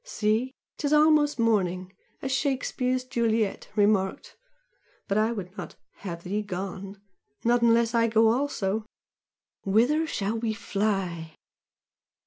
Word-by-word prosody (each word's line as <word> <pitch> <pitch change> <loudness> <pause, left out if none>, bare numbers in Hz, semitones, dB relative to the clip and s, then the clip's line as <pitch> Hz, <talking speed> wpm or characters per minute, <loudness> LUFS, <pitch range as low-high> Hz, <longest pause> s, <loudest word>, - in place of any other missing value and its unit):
"See? 240 - -1 0.2
''Tis 290 0 0
almost 300 -2 +4
morning!' 190 -5 0 0.3
as 270 - -2
Shakespeare's 255 -2 0
Juliet 230 -4 -1
remarked 205 -2 +1 0.7
but 195 - 0
I 215 +2 +2
would 195 -4 -6
not - - -7 0.2
'have 170 -3 -7
thee 205 +4 -2
gone' 195 0 -6 0.5
not 240 +1 +3
unless 230 0 +3
I 230 -1 +3
go 225 0 +4
also. 225 -5 0 0.8
Whither 245 +11 +2
shall 215 -5 -2
we 220 -1 -1
fly?" 195 -6 -2
220 Hz, 115 wpm, -27 LUFS, 195-245 Hz, 0.8 s, almost